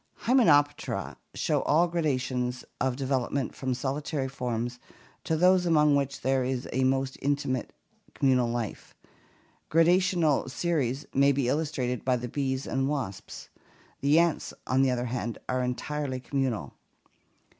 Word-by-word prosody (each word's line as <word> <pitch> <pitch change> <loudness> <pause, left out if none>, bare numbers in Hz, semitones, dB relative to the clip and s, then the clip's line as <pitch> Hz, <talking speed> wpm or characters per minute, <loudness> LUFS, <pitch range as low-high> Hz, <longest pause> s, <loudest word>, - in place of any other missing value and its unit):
Hymenoptera 145 - +3 0.2
show - - +1
all 165 +4 +3
gradations 130 -6 -1
of 130 -1 0
development 135 0 -1
from 130 -2 -2
solitary 140 +1 -2
forms 120 -2 -3 0.5
to 160 - 0
those 180 +1 +4
among 150 -3 +4
which 140 -1 -1
there 135 -1 +1
is 125 -1 -2
a 130 +2 +1
most 135 0 0
intimate 140 -3 -1 0.4
communal 130 -3 +2
life. 115 -3 -5 0.7
Gradational 165 -3 +3
series 140 -3 -1
may 140 +1 +5
be 135 -2 0
illustrated 130 -4 -1
by 130 -1 +2
the 125 +1 -5
bees 130 +1 -2
and 135 +1 -1
wasps. 130 -10 -5 0.5
The 145 +3 +3
ants, 170 -1 +1
on 130 +1 +2
the 135 - +4
other 125 -1 -1
hand, 120 -2 -3
are 130 0 0
entirely 130 +2 -3
communal. 125 - -2
135 Hz, 135 wpm, -28 LUFS, 125-150 Hz, 0.7 s, may